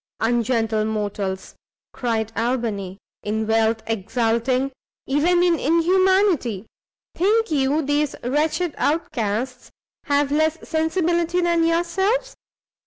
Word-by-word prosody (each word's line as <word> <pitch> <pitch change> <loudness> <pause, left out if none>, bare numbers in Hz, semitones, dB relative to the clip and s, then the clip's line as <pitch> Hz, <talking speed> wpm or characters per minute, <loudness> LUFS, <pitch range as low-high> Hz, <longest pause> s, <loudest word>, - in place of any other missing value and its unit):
"Ungentle 225 -2 +1
mortals!" 205 -3 -3 0.4
cried 225 -3 -2
Albany, 225 -6 -2 0.2
"in 220 +1 -2
wealth 225 0 +1
exulting; 230 +4 0 0.3
even 345 +6 +2
in 345 -2 +2
inhumanity! 335 - +2 0.5
think 430 +2 +1
you 290 +1 +1
these 290 +1 0
wretched 300 +6 0
outcasts 250 -5 -2 0.4
have 285 -1 +1
less 315 +2 +2
sensibility 340 +2 0
than 340 -1 +2
yourselves? 380 +9 0
275 Hz, 95 wpm, -22 LUFS, 225-335 Hz, 0.5 s, even